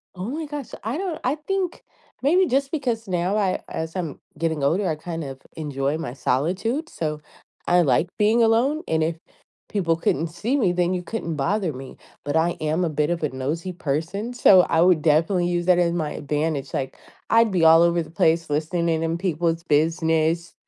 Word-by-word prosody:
Oh, 185 +4 -5
my 310 +4 -4
gosh, 290 -3 -6
I 225 +7 -2
don't, 360 -3 -3
I 260 +4 +1
think 365 +3 -3 0.4
maybe 355 +7 +3
just 275 +1 0
because 240 -8 -2
now 180 +2 0
I, 195 -3 +1
as 160 +2 -5
I'm 165 -6 -4 0.2
getting 160 -2 -1
older, 180 +8 +1
I 155 - 0
kind 165 +1 -6
of 135 -1 -7
enjoy 145 -1 -2
my 160 -7 -5
solitude, 185 - -1
so, 150 -2 -4 0.5
I, 175 0 +5
like, 145 +2 +2
being 220 +2 +3
alone, 245 +8 +3
and 160 -1 +1
if 165 0 -1 0.5
people 170 -5 0
couldn't 165 0 0
see 215 - -2
me, 205 -10 +2
then 175 0 +1
you 180 -1 -3
couldn't 170 -6 -4
bother 175 +3 0
me. 130 0 -10 0.3
But 145 +2 0
I 165 +2 +2
am 155 +3 0
a - - -1
bit 150 +1 0
of 175 -1 -1
a 150 - +1
nosy 150 +8 -4
person, 170 - -3
so, 195 -6 +7
I 165 -2 +1
would 175 -3 +4
definitely 165 +4 +2
use 175 -1 -1
that 180 -1 +5
as 170 -1 +2
my 155 -3 -2
advantage, 150 -1 -2
like, 135 -1 -3 0.3
I'd 230 -1 +4
be 180 -3 +1
all 165 +1 +8
over 170 0 +2
the 155 - -8
place 165 0 +1
listening 160 +3 0
in, 160 0 0
in 165 +1 -1
people's 170 -2 -1
business, 160 +1 +1
170 Hz, 195 wpm, -23 LUFS, 155-205 Hz, 0.5 s, all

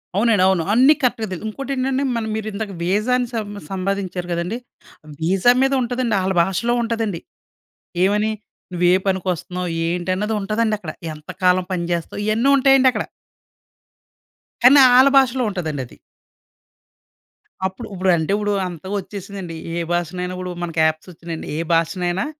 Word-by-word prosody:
అవునండి. 210 -2 +3
అవును. 190 -3 +2
అన్నీ 260 +6 +6
కరెక్ట్‌గా 245 -4 0
తెలియదు. 185 +3 -5
ఇంకోటి 275 +6 -5
ఏంటంటే, 265 +1 0
మన 230 - -1
మీరు 220 0 -4
ఇందాక 205 0 -4
వీజా 205 +7 0
అని 250 -1 -1
సం 220 -3 -3 0.2
సంబాదించారు 190 -2 -3
కదండి! 170 +6 -2 0.6
వీసా 185 +8 +3
మీద 270 +1 +2
ఉంటదండి. 245 -2 -1
ఆళ్ళ 190 +1 0
భాషలో 195 +6 -1
ఉంటదండి. 225 -6 -2 0.9
ఏమని? 210 +3 +2 0.4
నువ్వు 175 0 +1
ఏ - - +5
పనికొస్తున్నావు? 180 -1 -2 0.2
ఏంటి? 175 +2 -2
అన్నది 210 +3 -1
ఉంటదండి 215 +2 0
అక్కడ. 175 -6 -7 0.2
ఎంత 150 0 -12
కాలం 180 0 +4
పనిచేస్తావు? 170 +1 -3
ఇయన్నీ 225 +5 +2
ఉంటాయండి 270 -1 +5
అక్కడ. - - -2 1.6
కానీ, 265 +4 +8 0.2
ఆళ్ల 260 +2 +7
భాషలో 260 -1 +3
ఉంటదండి 160 -8 -3
అది. 120 - -17 1.7
అప్పుడు 190 - -9
ఇప్పుడంటే 180 -3 +1
ఇప్పుడు 205 0 -1 0.2
అంతగా 180 +2 -7
వచ్చేసిందండి. 195 -2 -7 0.2
ఏ - - 0
భాషనైనా 180 +1 -2
కూడా 180 0 -4
మనకి 165 -2 -3
యాప్స్ 155 +3 -1
వచ్చినాయండి. 165 -1 -7
ఏ - - -2
భాషనైనా 175 +3 0
195 Hz, 140 wpm, -20 LUFS, 175-230 Hz, 1.7 s, కానీ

